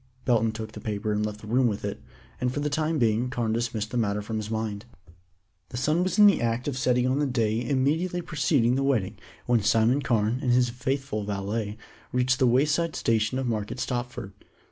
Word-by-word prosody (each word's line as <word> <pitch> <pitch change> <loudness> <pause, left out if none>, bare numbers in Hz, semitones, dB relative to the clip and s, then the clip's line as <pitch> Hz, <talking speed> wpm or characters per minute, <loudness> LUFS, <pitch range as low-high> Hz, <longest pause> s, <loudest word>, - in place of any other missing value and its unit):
Belton 115 -3 +3
took 110 0 -6
the - - -9
paper 105 0 -3
and 105 0 0
left 105 0 -4
the 110 - -10
room 125 +3 +3
with 105 -2 -3
it, 100 - -4 0.4
and 125 0 0
for 145 - -3
the 145 0 -1
time 160 +2 0
being 115 -1 +1
Carne 120 -3 -1
dismissed 115 -2 -2
the 125 - -2
matter 105 -2 0
from 110 +1 -4
his 110 0 -4
mind. 110 -1 -3 0.8
The - - -6
sun 155 +7 +1
was 185 +3 -1
in 210 - +8
the 200 - +5
act 120 +2 -1
of 140 - -1
setting 125 -1 +2
on 130 +2 +1
the 145 - +1
day 115 -2 0
immediately 155 +8 0
preceding 135 -6 +2
the 135 +1 +1
wedding 110 -7 0 0.3
when 120 -2 +3
Simon 115 +6 +3
Carne 115 -1 +1
and 125 -4 +2
his 125 -1 +3
faithful 130 -2 -2
valet 105 +2 -3 0.3
reached 125 +1 +1
the 130 - +4
wayside 150 +6 +2
station 115 +2 +1
of 130 - -1
Market 110 0 -3
Stopford. 120 -6 -4
120 Hz, 210 wpm, -26 LUFS, 110-135 Hz, 0.8 s, in